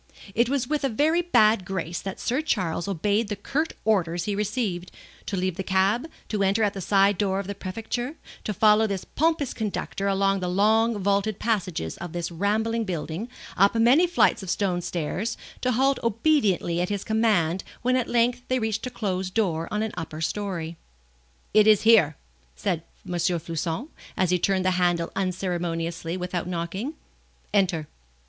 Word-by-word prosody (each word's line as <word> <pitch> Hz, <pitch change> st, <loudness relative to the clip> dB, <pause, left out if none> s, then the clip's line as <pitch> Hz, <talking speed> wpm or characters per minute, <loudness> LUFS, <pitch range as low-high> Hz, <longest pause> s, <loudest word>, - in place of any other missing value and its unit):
It 235 Hz, +3 st, +2 dB
was 265 Hz, -3 st, 0 dB
with 300 Hz, 0 st, -1 dB
a 275 Hz, -, +2 dB
very 310 Hz, +8 st, +2 dB
bad 215 Hz, -, +4 dB
grace 175 Hz, -2 st, -3 dB
that 195 Hz, 0 st, -6 dB
Sir 255 Hz, +5 st, 0 dB
Charles 185 Hz, -, -1 dB
obeyed 205 Hz, +4 st, 0 dB
the 205 Hz, -, -3 dB
curt 285 Hz, +10 st, -2 dB
orders 175 Hz, -6 st, +1 dB
he 205 Hz, -, -1 dB
received, 205 Hz, -4 st, -2 dB, 0.4 s
to 195 Hz, -, -2 dB
leave 185 Hz, -1 st, -1 dB
the 190 Hz, -, -2 dB
cab, 195 Hz, -, +1 dB, 0.2 s
to 210 Hz, -2 st, -1 dB
enter 200 Hz, +3 st, +2 dB
at 205 Hz, -1 st, +1 dB
a 195 Hz, -, -4 dB
side 195 Hz, +1 st, +3 dB
door 195 Hz, -2 st, +1 dB
of 200 Hz, -, -4 dB
the 200 Hz, -, -4 dB
Prefecture, 225 Hz, +8 st, -4 dB, 0.3 s
to -, -, -2 dB
follow 215 Hz, +2 st, +4 dB
this 195 Hz, -3 st, -3 dB
pompous 315 Hz, -3 st, 0 dB
conductor 200 Hz, -2 st, -3 dB
along 195 Hz, 0 st, +2 dB
the 180 Hz, -, -2 dB
long 220 Hz, +4 st, +3 dB
vaulted 200 Hz, +1 st, +1 dB
passages 185 Hz, -, -1 dB
of 175 Hz, -1 st, -7 dB
this 175 Hz, 0 st, -3 dB
rambling 220 Hz, +6 st, 0 dB
building, 180 Hz, +3 st, -4 dB, 0.3 s
up 200 Hz, +4 st, +4 dB
many 250 Hz, +10 st, +5 dB
flights 350 Hz, -, +3 dB
of 190 Hz, -, -7 dB
stone 185 Hz, -2 st, 0 dB
stairs, 175 Hz, +7 st, -3 dB, 0.2 s
to 255 Hz, -, +1 dB
halt 270 Hz, +3 st, +2 dB
obediently 215 Hz, -, +2 dB
at 180 Hz, -, -1 dB
his 205 Hz, -1 st, -2 dB
command 205 Hz, -6 st, +1 dB, 0.2 s
when 255 Hz, +1 st, +3 dB
at 255 Hz, -2 st, +1 dB
length 240 Hz, +1 st, +2 dB
they 255 Hz, -, +1 dB
reached 220 Hz, +1 st, -1 dB
a -, -, -3 dB
closed 185 Hz, -5 st, -3 dB
door 170 Hz, -7 st, +1 dB
on 210 Hz, +1 st, -1 dB
an 220 Hz, -, -2 dB
upper 155 Hz, -1 st, -6 dB
story. 170 Hz, -1 st, -3 dB, 0.8 s
"It 215 Hz, 0 st, +6 dB
is 215 Hz, -2 st, +6 dB
here!" 210 Hz, -10 st, +5 dB, 0.4 s
said 160 Hz, -, -1 dB, 0.2 s
M. -, -, -7 dB
Floçon, 170 Hz, -, -1 dB, 0.3 s
as 185 Hz, -1 st, +2 dB
he 180 Hz, -, +3 dB
turned 190 Hz, +1 st, +1 dB
the 185 Hz, -, +4 dB
handle 175 Hz, -2 st, +1 dB
unceremoniously 175 Hz, -2 st, -2 dB
without 180 Hz, -1 st, -3 dB
knocking. 180 Hz, -, -3 dB, 0.6 s
"Enter." 180 Hz, -6 st, +2 dB
200 Hz, 175 wpm, -25 LUFS, 180-225 Hz, 0.8 s, It